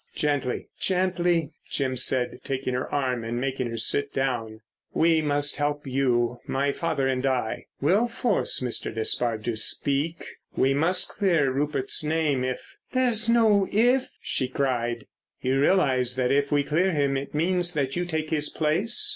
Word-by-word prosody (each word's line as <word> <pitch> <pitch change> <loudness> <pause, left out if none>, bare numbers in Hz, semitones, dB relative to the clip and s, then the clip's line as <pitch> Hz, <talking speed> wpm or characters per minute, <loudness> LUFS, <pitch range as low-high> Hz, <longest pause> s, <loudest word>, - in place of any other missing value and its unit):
"Gently, 145 -4 -1
gently," 180 -3 +1 0.2
Jim 130 -2 -1
said, 125 0 0
taking 130 -1 -3
her 125 +1 -3
arm 130 -4 -1
and 115 +1 -3
making 130 -1 -2
her 115 - -5
sit 140 +5 +1
down. 115 -5 -2 0.3
"We 165 -1 +3
must 145 -1 +1
help 145 0 -2
you, 125 -3 0
my 140 +1 0
father 140 -4 -1
and 130 -1 -1
I. 130 -4 -1
We'll 195 +11 +3
force 235 - 0
Mr. 125 -2 -1
Despard 115 0 -1
to 120 0 -2
speak—we 140 +2 -1
must 170 +6 +2
clear 170 -9 +1
Rupert's 140 +1 0
name 150 -4 0
if——" 130 0 -5 0.2
"There's 240 -3 +2
no 220 -4 +4
if!" 245 +5 +3
she 130 - 0
cried. 120 -3 -2 0.4
"You 130 +1 +1
realise 130 -8 +3
that 125 -1 0
if 140 +1 +1
we 145 -1 +3
clear 170 +6 +1
him 140 -2 +1
it 135 +2 -5
means 175 +2 +1
that 135 -2 -1
you 175 - 0
take 160 -2 -3
his 150 -2 +1
place? 175 +10 +1
140 Hz, 155 wpm, -25 LUFS, 130-170 Hz, 0.4 s, no